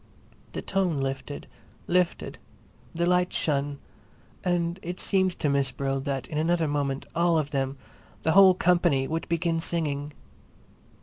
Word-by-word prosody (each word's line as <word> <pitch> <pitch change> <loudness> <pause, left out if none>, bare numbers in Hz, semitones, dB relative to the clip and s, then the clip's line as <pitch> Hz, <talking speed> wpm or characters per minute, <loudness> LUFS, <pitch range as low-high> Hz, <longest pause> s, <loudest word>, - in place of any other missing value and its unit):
The - - -4
tune 185 -6 0
lifted, 135 +1 -4 0.4
lifted, 180 -1 0 0.5
the 170 +1 -1
light 180 0 +2
shone; 145 -1 0 0.7
and 175 0 0
it 175 +2 -5
seemed 190 -2 +1
to - - 0
Miss 140 -1 +2
Brill 135 +1 -2
that 135 -2 -3
in 150 - -2
another 165 0 +2
moment 140 -2 -1
all 170 0 +3
of 150 -2 -1
them, 135 -1 -1
all - - -26
the 160 - +2
whole 190 +1 +8
company, 175 -7 +2
would 165 +1 -3
begin 170 0 +1
singing. 150 -3 -1
160 Hz, 145 wpm, -27 LUFS, 140-175 Hz, 0.7 s, whole